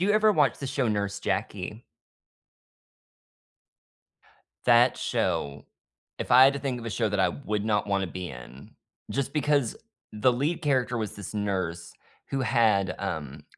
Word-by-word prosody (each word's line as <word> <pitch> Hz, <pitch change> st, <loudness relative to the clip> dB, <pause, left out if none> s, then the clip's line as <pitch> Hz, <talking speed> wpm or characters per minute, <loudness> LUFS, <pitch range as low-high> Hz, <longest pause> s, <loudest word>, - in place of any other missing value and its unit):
you 195 Hz, +3 st, +2 dB
ever 215 Hz, 0 st, +4 dB
watch 150 Hz, -7 st, +2 dB
the 140 Hz, -, -5 dB
show 130 Hz, -2 st, 0 dB
Nurse 100 Hz, -1 st, -2 dB
Jackie? 100 Hz, +3 st, -3 dB, 2.8 s
That -, -, +5 dB
show, 70 Hz, 0 st, -2 dB, 0.5 s
if -, -, -4 dB
I 125 Hz, +1 st, +9 dB
had 135 Hz, +1 st, +6 dB
to 140 Hz, -, -4 dB
think 130 Hz, -3 st, -3 dB
of 115 Hz, -, -9 dB
a -, -, -3 dB
show 110 Hz, -1 st, 0 dB
that 105 Hz, -, -1 dB
I 95 Hz, -1 st, +4 dB
would 105 Hz, -1 st, -3 dB
not 105 Hz, -2 st, +1 dB
wanna 100 Hz, -1 st, 0 dB
be 90 Hz, 0 st, -6 dB
in, 60 Hz, +2 st, -11 dB, 0.4 s
just 140 Hz, -1 st, -2 dB
because 145 Hz, -5 st, +1 dB, 0.4 s
the 115 Hz, +4 st, +2 dB
lead 150 Hz, +7 st, -1 dB
character 130 Hz, -5 st, +1 dB
was 110 Hz, -3 st, -4 dB
this 100 Hz, 0 st, -8 dB
nurse 95 Hz, -5 st, -2 dB, 0.4 s
who 135 Hz, -, -1 dB
had, 105 Hz, -7 st, +2 dB
um 75 Hz, -6 st, -5 dB
105 Hz, 155 wpm, -27 LUFS, 95-135 Hz, 2.8 s, I